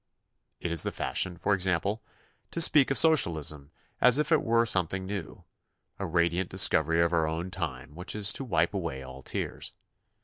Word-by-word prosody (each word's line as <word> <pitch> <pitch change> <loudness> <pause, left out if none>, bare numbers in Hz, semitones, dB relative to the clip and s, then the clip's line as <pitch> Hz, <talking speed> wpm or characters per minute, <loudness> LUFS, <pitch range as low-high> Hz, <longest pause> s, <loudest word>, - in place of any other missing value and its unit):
It 85 - -4
is 85 - +5
the - - -1
fashion, 90 -2 -2
for 105 - 0
example, 95 +3 0 0.5
to - - -5
speak 150 -4 +6
of 135 - +1
socialism 80 - +2 0.3
as 125 +1 +5
if 150 +2 -1
it 160 - +3
were 115 +1 +1
something 95 -3 -2
new, 100 -3 -7 0.6
a - - -4
radiant 85 +2 0
dis 95 0 +5
covery 80 +2 +1
of 85 - -2
our 80 -2 +1
own 85 +4 -5
time 85 -5 -6
which 90 +6 -6
is 105 0 +3
to - - -5
wipe 85 -7 0
away 85 -9 -5
all 65 +1 -11
tears. - - -6
90 Hz, 180 wpm, -27 LUFS, 80-105 Hz, 0.6 s, speak